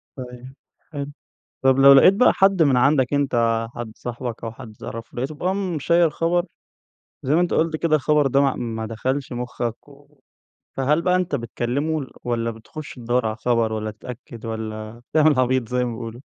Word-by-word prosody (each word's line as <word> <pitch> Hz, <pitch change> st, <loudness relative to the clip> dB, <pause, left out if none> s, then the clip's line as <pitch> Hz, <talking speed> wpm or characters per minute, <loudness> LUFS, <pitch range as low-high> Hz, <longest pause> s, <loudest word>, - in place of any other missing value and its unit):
طيب 125 Hz, 0 st, -9 dB, 0.4 s
حلو. 145 Hz, -1 st, -5 dB, 0.5 s
طب 135 Hz, 0 st, +4 dB
لو 140 Hz, 0 st, +9 dB
لقيت 140 Hz, +8 st, +7 dB
بقى 250 Hz, +6 st, +4 dB
حد 195 Hz, -2 st, +3 dB
من 135 Hz, -4 st, +3 dB
عندك 135 Hz, 0 st, +3 dB
أنت 115 Hz, -5 st, +1 dB
حد 120 Hz, -2 st, -6 dB
صاحبك 120 Hz, -1 st, -6 dB
أو 115 Hz, -, -3 dB
حد 110 Hz, -1 st, -11 dB
تعرفه، 115 Hz, 0 st, -8 dB
لقيته 135 Hz, +5 st, -3 dB
بقي 185 Hz, +5 st, -1 dB
مشيّر 170 Hz, -3 st, +2 dB
خبر- 170 Hz, +3 st, 0 dB, 0.8 s
زي 140 Hz, +3 st, +2 dB
ما 170 Hz, -, +4 dB
أنت 175 Hz, -, 0 dB
قُلت 160 Hz, 0 st, +1 dB
كده- 155 Hz, 0 st, +2 dB
الخبر 150 Hz, 0 st, +2 dB
ده 135 Hz, +1 st, +3 dB
ما 135 Hz, -2 st, +2 dB
ما 115 Hz, -2 st, -4 dB
دخلش 130 Hz, +5 st, -3 dB
مُخّك 120 Hz, 0 st, -4 dB
و 145 Hz, 0 st, -20 dB, 0.6 s
فهل 150 Hz, +5 st, +2 dB
بقى 180 Hz, +1 st, +3 dB
أنت 180 Hz, -5 st, -1 dB
بتكلّمه 140 Hz, +6 st, -2 dB
ل 130 Hz, -, -10 dB
والّا 115 Hz, -1 st, -1 dB
بتخُش 115 Hz, +7 st, -9 dB
تدوّر 120 Hz, -1 st, -1 dB
على 110 Hz, -, -1 dB
الخبر 115 Hz, -2 st, 0 dB
والّا 110 Hz, 0 st, -3 dB
تتأكد 115 Hz, +1 st, -10 dB
والّا 110 Hz, 0 st, -6 dB
تعمل 155 Hz, -3 st, +4 dB
عبيط 130 Hz, -2 st, +1 dB
زي 125 Hz, +1 st, 0 dB
ما 120 Hz, -, -2 dB
بيقولوا؟ 115 Hz, +1 st, -7 dB
130 Hz, 180 wpm, -22 LUFS, 115-150 Hz, 0.8 s, لو